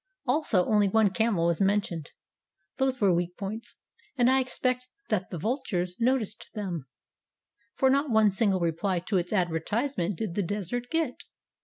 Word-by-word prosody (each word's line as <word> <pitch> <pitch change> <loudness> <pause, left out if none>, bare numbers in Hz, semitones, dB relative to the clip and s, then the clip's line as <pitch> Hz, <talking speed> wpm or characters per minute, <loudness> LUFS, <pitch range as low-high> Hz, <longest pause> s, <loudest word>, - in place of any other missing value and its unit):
Also 250 - +2
only 210 -2 +3
one 215 -1 +3
camel 205 -5 +1
was 170 0 +1
mentioned. 195 -6 0 0.7
These 265 -1 +1
were 195 -3 +4
weak 175 +1 -1
points, 215 +3 -6 0.4
and 245 0 +4
I 265 - +4
expect 255 -1 -1 0.2
that 195 -4 0
the 175 - -5
vultures 185 - -2
noticed 235 -3 0
them, 175 -9 -4 0.9
for 265 - +3
not 280 +2 +2
one 220 -2 +4
single 195 -2 +1
reply 170 +3 0
to 190 +2 0
its 175 0 -4
advertisement 185 - 0
did 215 -6 -3
the 205 - 0
Desert 205 +6 -3
get. 325 0 -1
205 Hz, 155 wpm, -28 LUFS, 180-245 Hz, 0.9 s, were